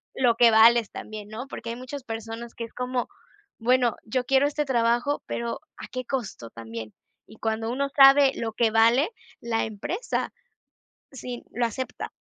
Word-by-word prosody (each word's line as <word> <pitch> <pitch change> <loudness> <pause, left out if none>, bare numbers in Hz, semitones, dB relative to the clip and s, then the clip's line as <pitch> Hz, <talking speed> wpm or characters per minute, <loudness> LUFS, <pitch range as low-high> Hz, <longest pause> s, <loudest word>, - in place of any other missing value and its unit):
lo 245 -3 +3
que 230 0 +6
vales 225 0 +6
también, 215 -1 -8
¿no? 230 +5 -6
Porque 230 -3 -6
hay - - -4
muchas 255 +2 -7
personas 225 0 -6
que 230 - -4
es 230 - -14
como: 250 0 -2 0.5
"Bueno, 245 0 +3
yo 250 +3 -1
quiero 270 +2 +4
este 295 +1 -1
trabajo", 240 +2 +1
pero 235 0 -3 0.2
¿a - - -8
qué 255 0 -5
costo 220 - -4
también? 115 -1 -8 0.3
Y 220 - -15
cuando 225 +1 -2
uno 275 +3 -1
sabe 275 0 +7
lo 230 -1 -3
que 225 0 +2
vale, 230 +7 +4 0.3
la 230 -1 0
empresa 270 - -3 0.8
sí 250 -2 -7
lo 240 0 +1
acepta. 255 +3 -5
235 Hz, 165 wpm, -26 LUFS, 225-260 Hz, 0.8 s, sabe